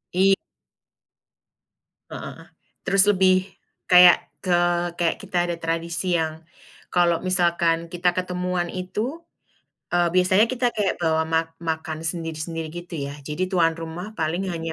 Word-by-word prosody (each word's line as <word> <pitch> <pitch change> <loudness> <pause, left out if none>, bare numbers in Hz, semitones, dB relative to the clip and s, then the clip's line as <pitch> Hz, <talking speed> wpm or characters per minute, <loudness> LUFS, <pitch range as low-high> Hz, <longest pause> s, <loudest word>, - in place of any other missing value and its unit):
Iy 195 +1 +5 1.8
Heeh, - - -8 0.4
terus 195 0 +4
lebih, 185 -1 +3 0.4
kayak 180 -1 +8 0.3
ke 180 -2 +2 0.4
kayak 170 -1 +1
kita 190 -2 -3
ada 175 - -2
tradisi 170 +2 -2
yang, 160 0 -3 0.5
kalau 175 -1 +2
misalkan 170 -2 +1
kita 175 +1 0
ketemuan 180 -1 -2
itu, 210 - -4 0.7
eee, 175 0 +3
biasanya 185 +4 +4
kita 245 -1 0
kayak 210 -3 0
bawa 160 -2 +1
ma 160 0 +3 0.2
makan 160 -1 -3
sendiri-sendiri 165 -1 -4
gitu 175 +1 -8
ya. 140 - -7
Jadi 150 +6 -3
tuan 165 -2 +2
rumah 175 +6 -7
paling 170 +4 -1
hanya 165 -1 -4
175 Hz, 125 wpm, -23 LUFS, 165-185 Hz, 1.8 s, kayak